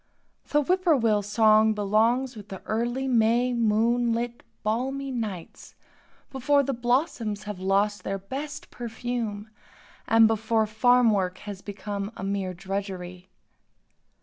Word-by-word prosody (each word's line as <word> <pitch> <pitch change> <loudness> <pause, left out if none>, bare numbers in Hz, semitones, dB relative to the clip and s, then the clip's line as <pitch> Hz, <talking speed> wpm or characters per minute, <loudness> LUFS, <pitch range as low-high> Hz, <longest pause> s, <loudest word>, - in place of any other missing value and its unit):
The 295 0 +2
"whippoorwill" 285 - +2
song 215 +1 +4
belongs 225 +5 +1
with 210 -2 -11
the 190 - -8
early 240 +4 -1
May 240 +1 +3
moonlit 235 +1 +1 0.2
balmy 265 +5 -2
nights, 210 -9 -6 0.6
before 280 +2 +2
the 275 0 -1
blossoms 240 -4 -1
have 210 -2 -6
lost 200 +2 +1
their 195 - -2
best 285 +9 -7
perfume 230 -3 -4 0.6
and 225 0 +6
before 220 0 +1
farm 235 +2 +4
work 185 -3 0
has 200 -2 -7
become 205 0 -5
a - - -6
mere 195 -2 -2
drudgery. 185 -1 -5
220 Hz, 120 wpm, -26 LUFS, 205-245 Hz, 0.6 s, and